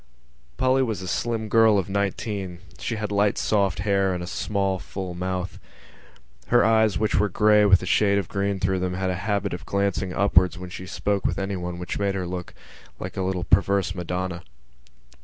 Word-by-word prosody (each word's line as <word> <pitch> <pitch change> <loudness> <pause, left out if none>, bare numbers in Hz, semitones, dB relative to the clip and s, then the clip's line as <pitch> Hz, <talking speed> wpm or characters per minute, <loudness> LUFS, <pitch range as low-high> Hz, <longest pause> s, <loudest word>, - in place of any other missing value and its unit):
_ - - -34
Polly 130 +1 +3
was 110 -7 -2
a - - -6
slim 115 +3 -2
girl 110 -1 +5
of 95 - 0
nineteen; 100 -1 -2 0.2
she 115 - -3
had 105 -1 -4
light 100 0 +2
soft 100 -4 +1
hair 100 -2 +1
and 90 - -4
a - - -4
small 95 0 -1
full 95 0 -6
mouth. 90 +1 -4 0.9
Her 120 0 +4
eyes, 110 -2 +3
which 110 -4 +1
were 105 0 +2
grey 105 +2 +4
with 95 -2 +5
a - - -3
shade 100 +1 +3
of 100 -4 -1
green 100 +1 -1
through 95 0 0
them, 90 0 -2
had 95 0 -1
a - - -2
habit 100 -1 0
of 90 - -6
glancing 100 -2 0
upwards 90 -2 +3
when 90 0 -8
she 95 0 -7
spoke 100 +1 -1
with - - 0
anyone, 90 -3 -3
which 90 0 -4
made 100 -1 0
her 95 -2 -2
look 90 0 -6 0.4
like - - -6
a - - -2
little 95 -1 -1
perverse 95 +1 +2
madonna. 90 -1 -3
95 Hz, 195 wpm, -24 LUFS, 90-105 Hz, 0.9 s, girl